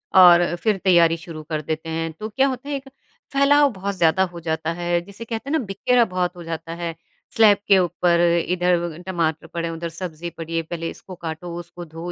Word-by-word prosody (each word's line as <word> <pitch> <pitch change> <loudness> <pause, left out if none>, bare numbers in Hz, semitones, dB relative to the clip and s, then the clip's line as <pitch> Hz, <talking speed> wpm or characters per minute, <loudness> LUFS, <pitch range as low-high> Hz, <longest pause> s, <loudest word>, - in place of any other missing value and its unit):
और 175 -2 +7
फिर 215 -3 +2
तैयारी 170 -3 +5
शुरू 165 -2 -9
कर 155 -2 -1
देते 160 +2 -4
हैं। 165 0 -2
तो 215 0 -4
क्या 265 +6 +2
होता 270 +1 -4
है 290 - -1
एक 270 0 -7 0.4
फैलाव 285 +1 +5
बहुत 200 +1 -4
ज़्यादा 175 +1 +3
हो 170 - -8
जाता 160 0 -2
है 175 0 0
जिसे 200 +5 -10
कहते 230 +4 -5
हैं 320 - +2
ना 265 - -2
बिखेरा 235 +5 +2
बहुत 180 -2 -2
हो 175 - -9
जाता 165 0 -5
है, 170 -1 -4 0.4
स्लैब 215 -4 +6
के 195 - +6
ऊपर, 175 -1 +2 0.3
इधर 175 -2 0
टमाटर 165 -3 -1
पड़े 170 0 -3
हैं, 165 - -4
उधर 170 +1 -4
सब्ज़ी 170 0 -6
पड़ी 165 0 -7
हैं, 165 - 0
पहले 165 -1 -3
इसको 185 - -10
काटो, 170 +1 -6
उसको 175 0 -9
धोवो, 165 +2 -7
175 Hz, 215 wpm, -22 LUFS, 165-195 Hz, 0.4 s, और